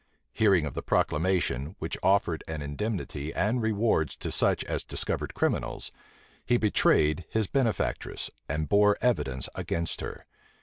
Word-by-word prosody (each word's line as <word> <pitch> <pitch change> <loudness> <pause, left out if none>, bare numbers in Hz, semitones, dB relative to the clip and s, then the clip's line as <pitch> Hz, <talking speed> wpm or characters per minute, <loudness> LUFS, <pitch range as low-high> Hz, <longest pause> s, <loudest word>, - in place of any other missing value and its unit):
Hearing 95 -7 +4
of 70 - -4
the - - -3
proclamation, 85 -2 0
which 80 +1 -4
offered 95 -4 +2
an 80 -2 -4
indemnity 75 -1 -3
and 110 +7 +1
rewards 110 -7 +1
to - - -5
such - - +2
as - - -3
discovered - - -3
criminals, 60 0 -1 0.5
he 120 - +3
betrayed 90 -6 +3
his 110 -1 +1
benefactress, 120 0 -1 0.2
and 75 0 -1
bore 105 0 +4
evidence 65 - 0
against 85 0 -3
her. - - -6
90 Hz, 135 wpm, -28 LUFS, 75-110 Hz, 0.5 s, Hearing